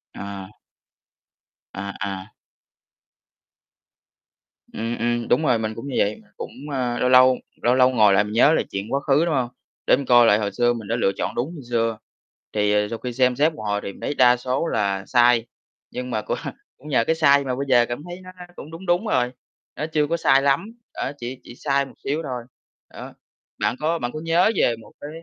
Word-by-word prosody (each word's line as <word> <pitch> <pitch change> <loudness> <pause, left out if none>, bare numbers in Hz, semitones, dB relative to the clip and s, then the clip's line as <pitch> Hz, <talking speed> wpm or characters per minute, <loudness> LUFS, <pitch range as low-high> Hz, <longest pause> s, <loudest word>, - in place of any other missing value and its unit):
À. 100 0 -8 1.2
À, 100 +1 -5
à. 95 -1 -4 2.5
Ừm, 115 +2 -3
ừm, 120 0 -1
đúng 130 - +2
rồi, 120 -5 +3
mình 110 0 -3
cũng 115 +6 -7
như 135 - -4
vậy, 105 +2 0 0.2
cũng, - - -6 0.2
a, 125 -3 -1
lâu 125 - +2
lâu 130 0 +7 0.3
lâu 120 +1 +3
lâu 130 0 +5
ngồi 110 -5 +4
lại, 95 +1 +4
mình 105 +1 -6
nhớ 140 +7 +5
lại - - +1
chuyện 100 +4 -5
quá 140 - +2
khứ, 145 +3 +2
đúng 170 - 0
hông? 125 -3 0 0.4
Để - - +6
mình 140 - -5
coi 120 -1 +6
lại 105 -2 +5
hồi 105 -2 -2
xưa 120 0 +2
mình 115 -3 -7
đã 115 - 0
lựa 105 -5 +2
chọn - - -3
đúng 140 +9 -3
như 145 - -9
xưa. 115 -2 0 0.6
Thì, 105 -1 +1
ờ, 105 0 +2
sau 115 - -4
khi 125 -1 -5
xem 125 0 +2
xét 155 +5 +2
một 110 - -9
hồi 105 0 0
thì - - -4
mình - - -17
thấy - - -2
đa 125 -1 +5
số 130 +6 -2
là 100 -7 -1
sai, 120 -1 +4 0.5
nhưng 125 0 -5
mà 110 - -1
cũng - - -3 0.4
cũng 140 - -15
nhờ 130 -5 +3
cái 160 - +2
sai 140 -3 +4
mà 130 -2 -2
bây 140 +2 -3
giờ 120 -2 +5
cảm 120 +5 -5
thấy 175 +1 -8
nó 185 - -12 0.3
cũng 155 - -10
đúng 165 +4 -9
đúng 175 +4 +1
rồi, 125 -11 +1 0.4
nó 150 - -3
chưa 155 -2 0
có 170 +3 0
sai 135 -4 +4
lắm, 140 +6 +2 0.3
ờ, 135 - -4
chỉ 125 0 -6
chỉ 120 - -12
sai 140 +1 0
một 135 - -14
xíu 150 +4 -1
thôi. 125 -5 -5 0.5
Đó. - - -9 0.5
Bạn - - 0
có 165 +2 0
bạn 120 -3 -3
có 155 - -6
nhớ 165 +6 +3
về 120 - +2
một - - -16
cái, 145 - -7
125 Hz, 220 wpm, -23 LUFS, 115-140 Hz, 2.5 s, lâu